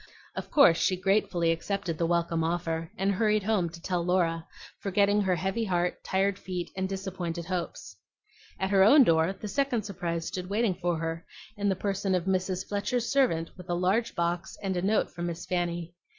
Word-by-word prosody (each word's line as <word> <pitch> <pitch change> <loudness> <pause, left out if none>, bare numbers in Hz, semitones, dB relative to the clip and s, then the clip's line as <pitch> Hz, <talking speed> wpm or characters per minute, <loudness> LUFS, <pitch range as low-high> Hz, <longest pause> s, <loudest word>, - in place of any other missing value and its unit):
Of - - -5
course 180 - +6
she 185 - +2
gratefully 185 -3 +2
accepted 165 -1 -2
the 165 - +2
welcome 170 -1 +1
offer, 165 -1 -2
and 195 +1 +1
hurried 210 +1 +2
home 195 -5 +1
to 170 +1 -11
tell 175 0 -1
Laura, 170 -2 +1 0.3
forgetting 200 +1 +2
her 190 -2 +2
heavy 190 +6 -1
heart, 180 -2 -1
tired 195 +1 0
feet, 180 -2 -5
and 190 0 -2
disappointed 185 -3 -4
hopes. 175 - -4 0.6
At 190 +1 -1
her 195 -1 +6
own 275 +8 +8
door 165 -3 +3
the 205 +2 -7
second 250 0 0
surprise 170 -4 -3
stood 180 0 -5
waiting 210 0 +1
for 175 -2 -1
her, 165 +1 -3 0.3
in 205 -1 0
the 190 - +1
person 195 0 -1
of 180 -1 -1
Mrs. 185 -1 -1
Fletcher's 230 +4 -1
servant 205 -13 +2
with 180 -1 -12
a 175 - +1
large 195 +7 +1
box 170 +1 -2
and 190 -1 -1
a 175 - 0
note 205 +4 +1
from 175 0 -4
Miss 170 0 -5
Fanny. 175 -1 -2
185 Hz, 190 wpm, -28 LUFS, 170-200 Hz, 0.6 s, own